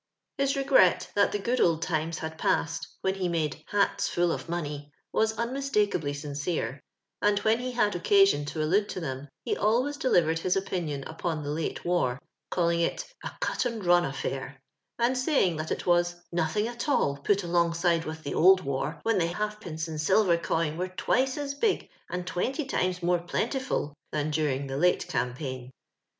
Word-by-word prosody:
His 275 +1 +2
regret 275 - +4
that 200 0 +3
tlie 205 -1 -3
good 245 +1 +1
old 165 -1 +3
times 160 0 -1
had 160 0 -6
passed, 165 +1 0
when 190 - +1
he 190 -2 -2
made 155 -4 -2
" - - -37
hats 205 -1 +1
ftall 175 -1 +1
of - - -6
money," 150 -4 -4 0.2
was 220 0 +1
un 235 +2 -1
mistakably 210 - 0
sincere; 145 -2 -3 0.4
and 205 0 +3
when 220 +3 +2
ho 250 +1 -3
had 220 -5 +1
occasion 195 -3 +4
to 155 +1 -2
allude 200 +7 +2
to - - -4
them, 135 -4 -5 0.2
he - - 0
alwap 240 +7 +2
deHvered 165 - +3
his 180 +2 +1
opinion 170 -7 -2
upon 160 -1 -3
the 145 - -3
late 160 +1 -3
war, 155 -8 +1 0.3
calling 170 -1 +1
it 170 - 0 0.2
a - - -3
cut - - 0
and 230 -5 -3
run 175 0 +5
affair,' 135 -2 -4 0.4
and 240 +2 +2
saying 255 - +2
that 155 0 -4
it - - -2
was 175 0 +3 0.2
nothing 175 +6 0
at 240 +4 -4
all 140 - +2
put 200 +8 +1
alongside 170 -1 +2
with 160 0 -6
the 140 - -3
old 185 +3 +6
war, 140 +2 -3
when 225 -3 +2
the 165 - +2
halfpence 175 -4 -4
and 155 -1 -4
silver 190 +1 +4
coin 165 -2 -1
were 180 - 0
twice 260 +8 0
as 285 -1 -3
big 395 +9 0 0.2
and 180 0 -3
twenty 260 - -2
times 185 -8 -1
more 175 0 +3
plentiful" 220 - -2 0.2
than 150 0 -1
during 145 -3 0
the 135 0 -4
late 180 +4 +2
campaign. 130 -1 -3
175 Hz, 185 wpm, -28 LUFS, 155-210 Hz, 0.4 s, old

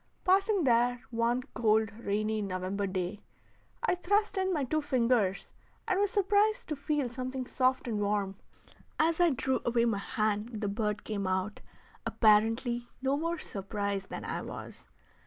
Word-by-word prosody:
Passing 390 +1 +3
there 245 -1 +3
one 235 +2 +1
cold, 220 -1 +2
rainy 215 0 -1
November 195 +1 -2
day, 190 +2 -3 0.6
I - - +3
thrust 405 +4 +1
in 380 -1 +1
my 305 -6 0
two 310 +4 0
fingers 235 -8 +1 0.3
and 375 - +2
was 410 0 +3
surprised 410 +1 +2
to 305 - -1
feel 285 -1 -1
something 255 +1 -4
soft 255 0 +1
and 220 -3 -1
warm: 200 -1 0 0.6
as 325 +1 +2
I 350 -1 +6
drew 265 -2 0
away 235 0 +2
my 225 -4 +1
hand 215 +2 -1
the 205 - 0
bird 210 0 -2
came 200 -3 -3
out, 190 +2 -1 0.4
apparently 225 +2 +2
no 270 +1 +2
more 335 +3 -1
surprised 200 -4 -3
than - - -6
I - - -3
was. - - -8
235 Hz, 155 wpm, -30 LUFS, 210-295 Hz, 0.6 s, I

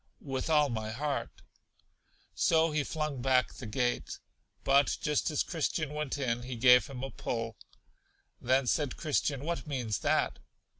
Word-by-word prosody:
With 135 +1 -3
all 150 -2 +4
my 110 -2 -3
heart. 140 +5 -2 1.0
So 160 0 +3
he 150 -1 +1
flung 150 -3 -3
back 130 -1 +2
the 120 - -8
gate. 120 +3 -1 0.5
But 140 +1 +3
just 150 +2 0
as 150 - +1
Christian 155 -2 -2
went 150 -2 -3
in, 120 -4 -1
he 125 +1 -6
gave 125 -1 +6
him 130 -1 -7
a 135 - -4
pull. 115 -1 -4 0.9
Then 130 +2 +2
said 140 +1 0
Christian: 145 -3 -1
What 165 -6 -3
means 125 -8 -2
that? - - +1
135 Hz, 150 wpm, -31 LUFS, 125-150 Hz, 1.0 s, gave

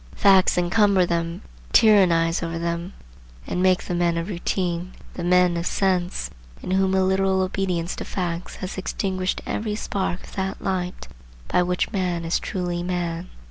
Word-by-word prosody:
Facts 190 -2 +5
encumber 190 +1 +3
them, 170 0 -2 0.3
tyrannize 175 -6 +5
over 165 -1 -3
them, 170 +2 -3 0.5
and 180 - -2
make 185 -1 +3
the - - -4
men 175 -1 +1
of 165 +4 -3
routine, 180 -1 -2 0.2
the 175 - -5
men 180 0 +4
of 170 +1 -2
sense, 185 -2 0 0.3
in - - -4
whom 190 0 +2
a 190 - +3
literal 190 0 +2
obedience 185 -2 -1
to - - -4
facts 175 -2 -4
has 185 0 -5
extinguished 185 -1 -2
every 210 -1 -2
spark 190 -4 -3
of - - -13
that 190 0 -3
light 185 -2 -3 0.4
by 180 - +3
which 180 0 0
man 180 -5 -1
is 165 - +1
truly 175 -2 -3
man. 175 -1 -3
180 Hz, 160 wpm, -23 LUFS, 175-190 Hz, 0.5 s, Facts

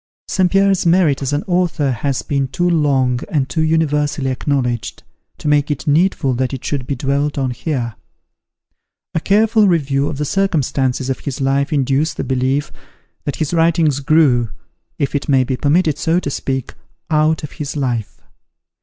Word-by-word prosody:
St. 185 -2 +1
Pierre's 195 -1 +3
merit 170 -5 +3
as 135 - -2
an 145 +1 -1
author 175 -6 +1
has 130 +2 -2
been 140 -2 -1
too 175 +7 -1
long 135 -7 +2
and 140 -4 0
too 140 +5 -1
universally 150 -3 +1
acknowledged, 125 -5 -2 0.3
to - - -6
make 150 0 +2
it 145 -2 -3
needful 150 -3 +2
that 130 +2 -1
it 130 - -9
should 135 -4 -3
be 140 - -1
dwelt 140 +3 -1
on 130 -2 0
here. 125 -2 -3 1.2
A - - +1
careful 215 +4 +3
review 140 -5 +1
of - - -5
the 150 - -1
circumstances 135 -8 0
of 130 - -3
his 135 -2 -5
life 140 +2 +1
induces 140 +2 +1
the - - -3
belief, 135 +2 -1 0.5
that 145 - -2
his 155 0 -2
writings 165 -3 +2
grew 135 -6 +3 0.5
(if 140 - -1
it 145 0 -2
may 135 -2 +4
be 130 +1 -2
permitted 155 +3 +1
so 165 +2 +2
to 140 - -4
speak) 135 -2 -3 0.4
out 155 0 +2
of 150 - -6
his 145 0 -4
life. 120 -6 -3
145 Hz, 170 wpm, -18 LUFS, 135-160 Hz, 1.2 s, may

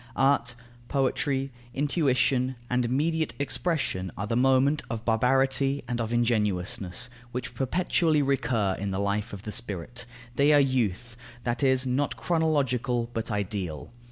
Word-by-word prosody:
Art, 135 -3 +2 0.3
poetry, 135 0 0 0.2
intuition, 130 -3 +1 0.2
and 125 0 +2
immediate 155 +6 0
expression 135 - -1
are 100 - -2
the 115 +2 -1
moment 135 +4 +3
of 115 -1 -4
barbarity 135 +4 +2
and 120 -2 -2
of 115 0 -3
ingenuousness, 105 -4 0 0.2
which 125 0 -4
perpetually 155 +1 +1
recur 120 -8 +1
in 100 0 -2
the 95 - -2
life 100 +2 -1
of 100 -1 -8
the 105 - -5
spirit; 105 +3 -3 0.3
they 145 +2 +5
are 145 - +7
youth, 120 -4 0 0.3
that 120 +3 -1
is, 130 -1 +3
not 130 +3 0
chronological, 135 -8 0
but 115 +1 -3
ideal. 100 -6 -3
125 Hz, 135 wpm, -27 LUFS, 110-140 Hz, 0.3 s, are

